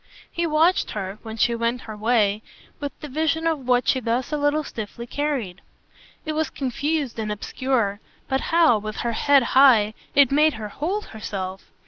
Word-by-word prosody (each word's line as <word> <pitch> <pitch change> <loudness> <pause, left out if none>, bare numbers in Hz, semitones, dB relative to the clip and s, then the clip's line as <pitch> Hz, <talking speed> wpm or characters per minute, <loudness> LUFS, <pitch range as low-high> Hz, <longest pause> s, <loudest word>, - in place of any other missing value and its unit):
He 340 0 -1
watched 320 +4 +3
her, 195 -1 -5
when 220 -1 -8
she 235 +2 +2
went 235 +1 -1
her 220 - -8
way, 215 -1 +1 0.4
with 285 -1 -4
the 300 - -6
vision 315 +3 -1
of 305 -6 -1
what 250 0 +2
she 260 - +3
thus 240 +2 -1
a 300 - 0
little 290 +1 +1
stiffly 235 -2 -7
carried. 250 -9 -3 0.6
It 310 - -2
was 315 +1 -1
confused 280 -1 -2
and 215 -1 -2
obscure, 210 -1 -1 0.3
but 265 0 0
how, 325 -9 +4
with 215 +1 -6
her 235 - -1
head 280 +3 +4
high, 240 -6 +6 0.2
it 280 -2 +6
made 305 +2 +4
her 215 -1 -6
hold 365 - -3
herself! 195 -3 -6
255 Hz, 175 wpm, -23 LUFS, 220-300 Hz, 0.6 s, high